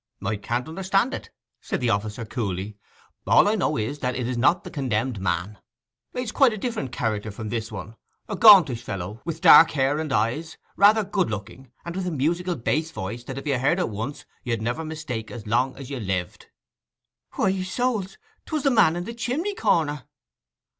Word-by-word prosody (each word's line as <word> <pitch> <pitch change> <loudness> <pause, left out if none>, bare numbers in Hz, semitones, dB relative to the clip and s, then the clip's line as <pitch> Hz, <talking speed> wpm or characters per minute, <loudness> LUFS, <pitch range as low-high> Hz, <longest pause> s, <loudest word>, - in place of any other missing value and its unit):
'Can't 120 +6 -2
understand 195 +8 0
it,' - - -6 0.3
said - - -3
the 120 -2 +1
officer 105 +2 -2
coolly. 100 -3 -4 0.5
'All - - +6
I 210 - +3
know 190 -7 0
is 115 +7 -3
that 125 -2 -2
it 125 -2 -2
is 125 - -2
not 145 +9 +3
the - - -9
condemned 125 - -1
man. 90 +2 -2 0.5
He's 250 -3 -4
quite 265 -5 +4
a - - -5
different 215 - -3
character 110 -5 -2
from 110 +1 -6
this 110 -1 -3
one; 105 +1 -8 0.3
a 210 - -3
gauntish 180 - +7
fellow, 100 +4 -6
with 165 -1 -4
dark 160 - +9
hair 140 +1 +1
and 155 -2 -3
eyes, 130 +9 -1 0.2
rather 210 +2 +5
good 195 - 0
looking, 110 +5 -7
and 170 0 -5
with 185 -1 -2
a - - -1
musical 170 +5 0
bass 155 +6 -1
voice 115 -4 -6
that 135 -1 -6
if 135 - -6
you 140 -4 0
heard 140 +7 +2
it 180 - 0
once 110 +7 -5 0.2
you'd 115 -3 -1
never 120 +8 -2
mistake 155 -8 -5
as 120 -4 -8
long 120 +5 0
as 135 0 -9
you 135 - -4
lived.' 95 -4 -4 0.9
'Why, 190 0 +1
souls—'twas 230 - -3
the 275 - +3
man 170 -9 +4
in 175 - -3
the 230 - -6
chimney 265 - -2
corner! 160 - 0
135 Hz, 190 wpm, -24 LUFS, 115-185 Hz, 0.9 s, dark